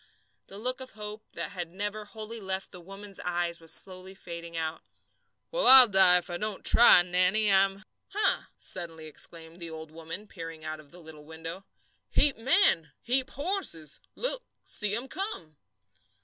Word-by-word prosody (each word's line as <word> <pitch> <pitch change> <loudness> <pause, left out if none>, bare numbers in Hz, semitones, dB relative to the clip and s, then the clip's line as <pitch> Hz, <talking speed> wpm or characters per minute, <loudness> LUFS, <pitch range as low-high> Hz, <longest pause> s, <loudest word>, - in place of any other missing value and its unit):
The 195 - -10
look 255 +4 -2
of 260 - -10
hope 210 0 -7
that - - -5
had 175 -4 -6
never 205 +3 -5
wholly 220 +2 -7
left 190 -1 -3
the 180 - -10
woman's 195 +2 -10
eyes 175 -1 -2
was 165 -1 -5
slowly 185 0 -1
fading 170 -2 -9
out. 160 0 -3 0.7
"We'll - - +2
all 260 -1 +12
die 190 -3 +6
if 180 - -4
I 175 - -3
don't 215 -2 -5
try, 230 -6 +7
Nannie. 185 +4 +1
I'm 195 +1 +2
" - - -55
"Huh!" 425 - +3
suddenly 165 -3 -5
exclaimed 160 +2 -8
the 170 -2 -8
old 160 -1 -10
woman, 165 +5 -8
peering 165 -5 -10
out 155 0 -5
of 150 -2 -17
the 175 - -14
little 160 -3 -12
window. 165 +4 -8 0.4
"Heap 290 -2 +3
men, 230 - +2
heap 260 +2 0
horses! 285 - -2 0.2
Look, - - -1 0.2
see 210 -1 -2
'em 240 +4 -4
come!" 225 - -4
190 Hz, 170 wpm, -28 LUFS, 165-215 Hz, 0.7 s, all